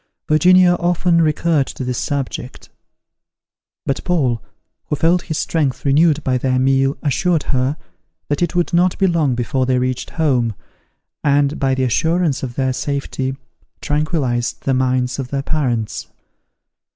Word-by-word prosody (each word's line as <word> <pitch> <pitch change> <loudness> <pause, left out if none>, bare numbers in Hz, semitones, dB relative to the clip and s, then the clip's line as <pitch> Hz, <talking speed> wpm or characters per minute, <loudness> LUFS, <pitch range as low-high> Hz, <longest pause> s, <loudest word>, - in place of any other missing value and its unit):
Virginia 180 +3 +5
often 175 -1 +2
recurred 155 -2 +1
to - - -6
this 125 -1 -2
subject; 135 -3 -4 1.2
but 135 - -2
Paul, 135 -10 0 0.5
who - - -1
felt 165 +5 +2
his 155 -3 -4
strength 145 -6 -1
renewed 150 +2 +3
by 130 -1 0
their 130 0 0
meal, 135 +1 +2
assured 165 +2 +1
her, 130 +3 0 0.5
that 145 +2 -1
it 175 - 0
would 175 0 0
not 180 +1 +3
be 195 - +2
long 160 -8 +1
before 125 +2 -1
they 130 -1 +2
reached 125 0 -2
home, 125 - 0 0.7
and, 145 0 +2
by 135 -2 +1
the 130 - 0
assurance 160 +4 +1
of 125 -3 -5
their 130 -1 0
safety, 135 -1 -3 0.4
tranquillized 145 -6 -1
the 135 - 0
minds 130 0 0
of 135 - -3
their 140 +1 -3
parents. 125 -9 -2
140 Hz, 145 wpm, -19 LUFS, 130-160 Hz, 1.2 s, Virginia